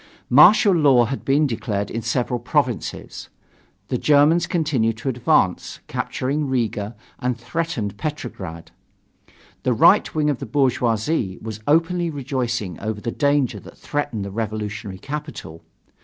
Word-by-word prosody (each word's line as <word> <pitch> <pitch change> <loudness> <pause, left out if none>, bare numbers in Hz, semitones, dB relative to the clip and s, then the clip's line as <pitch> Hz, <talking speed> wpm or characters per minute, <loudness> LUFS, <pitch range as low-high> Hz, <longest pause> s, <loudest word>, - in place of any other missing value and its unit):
Martial 195 - +7
law 140 -7 +5
had 135 +4 -4
been 145 +3 +3
declared 105 -5 -2
in 115 - -3
several 120 +2 -1
provinces. 125 - -2 0.6
The - - -1
Germans 150 +3 +4
continued 130 -10 0
to 125 +5 -3
advance, 115 -7 +1
captured 135 +3 -2
Riga, 120 -6 -2 0.2
and 125 -2 -1
threatened 125 - -3
Petrograd. 95 - -6 0.9
The - - +1
right - - +4
wing 150 -1 +2
of 135 - -4
the - - -6
bourgeoisie 120 - 0
was 110 -1 -7
openly 170 +3 +2
rejoicing 125 - -3
over 110 -1 -3
the 115 - -3
danger 140 -2 +1
that - - -14
threatened 145 -9 -3
the 100 - -6
revolutionary 105 -2 -4
capital. 145 - -7
125 Hz, 130 wpm, -22 LUFS, 110-150 Hz, 0.9 s, Martial